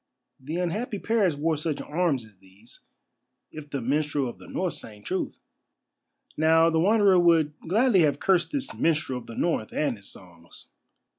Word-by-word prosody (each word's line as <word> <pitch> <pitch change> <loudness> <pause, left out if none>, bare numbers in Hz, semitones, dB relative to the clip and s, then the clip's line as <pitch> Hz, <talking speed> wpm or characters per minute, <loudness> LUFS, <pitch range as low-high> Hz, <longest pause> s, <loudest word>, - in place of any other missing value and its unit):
The 150 +5 -6
unhappy 205 +6 -2
Paris 200 -6 +1
wore 155 +2 0
such 155 0 -2
arms 150 -6 -1
as 105 -3 -20
these, 95 +5 -18 0.7
if 155 -1 -10
the 140 -2 -3
minstrel 145 +1 0
of 120 - -8
the - - -13
North 185 -2 -2
sang 105 -2 -10
truth." 185 - -3 1.0
Now, 160 +1 +4
the 160 - +1
Wanderer 200 0 +4
would 165 -3 +3
gladly 220 +3 +3
have 145 -3 +2
cursed 185 -3 +2
this 280 -2 -2
minstrel 155 -6 0
of 120 - -15
the 115 - -9
North 160 -10 -1
and 140 -6 -1
his 100 - -8
songs. 85 -2 -15
155 Hz, 165 wpm, -26 LUFS, 130-180 Hz, 1.0 s, Now